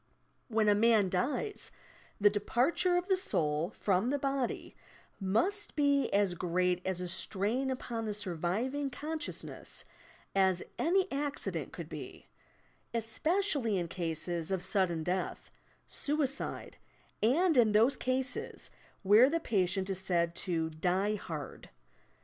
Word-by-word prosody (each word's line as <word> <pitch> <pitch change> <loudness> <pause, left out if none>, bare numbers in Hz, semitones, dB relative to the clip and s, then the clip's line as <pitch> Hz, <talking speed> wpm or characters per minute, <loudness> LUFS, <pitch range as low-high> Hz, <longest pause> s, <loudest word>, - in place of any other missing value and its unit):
When 220 -2 +1
a 205 - +6
man 215 -2 +4
dies, 255 - -1 0.5
the 205 - +6
departure 250 - +2
of 355 +1 -1
the 385 - +4
soul 155 - 0
from 200 +1 0
the 285 - +1
body 275 -2 -2 0.4
must 230 - +1
be 285 -2 +2
as 200 -2 +2
great 180 +1 0
a 190 - 0
strain 205 +8 -1
upon 235 -3 -3
the 210 -1 -2
surviving 210 - -1
con 305 +5 -4
sciousness - - -5 0.5
as 190 -2 +3 0.2
any 370 +3 +3
accident 285 +1 -2
could - - -7
be, - - -8 0.7
especially 265 - +1
in 175 -2 -1
cases 170 -1 -3
of 190 -2 -1
suddeu 185 -4 0
death, 185 +3 -3 0.3
suicide 285 -2 -2 0.4
and 320 +10 +3
iu 240 -3 +7
those 220 +5 +4
cases 255 +1 -3 0.3
where 215 +7 +7
the 330 +2 +1
patient 190 - 0
is 190 -2 -2
said 170 -3 +1
to 165 -3 -2
"die 185 +6 +1
hard." 160 -8 -6
210 Hz, 125 wpm, -32 LUFS, 185-275 Hz, 0.7 s, iu